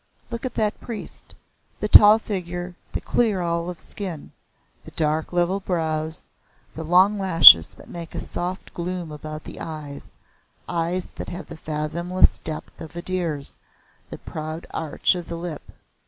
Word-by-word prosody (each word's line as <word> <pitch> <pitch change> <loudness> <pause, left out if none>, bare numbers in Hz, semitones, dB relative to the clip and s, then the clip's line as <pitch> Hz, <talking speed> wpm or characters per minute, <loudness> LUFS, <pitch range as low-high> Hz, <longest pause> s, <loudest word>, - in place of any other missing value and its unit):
Look 235 +2 -3
at - - -10
that 215 -1 -1
priest 230 -4 -5 0.4
the 210 - -1
tall 210 +1 +8
figure, 180 -4 -5 0.2
the - - -4
clear 220 -5 +1
olive 170 0 -2
skin, 180 -7 -7 0.5
the - - -11
dark 155 0 -1
level 175 +2 +1
brows, 160 -4 +2 0.5
the 160 - -6
long 185 +5 +4
lashes 165 - +8
that - - -15
make 170 -2 -9
a - - -2
soft 180 +2 -6
gloom 175 -1 -4
about 155 +1 -8
the - - -10
eyes 155 -3 -8 0.5
eyes 175 +1 -1
that - - -6
have 175 - -7
the - - -8
fathomless 160 +4 0
depth 155 -1 -8
of 160 +1 -10
a 170 - -6
deer's, 170 -7 0 0.5
the - - -7
proud 155 +1 -7
arch 160 +3 0
of 175 -2 -6
the 170 - -5
lip. 165 -3 -7
170 Hz, 155 wpm, -23 LUFS, 160-185 Hz, 0.5 s, tall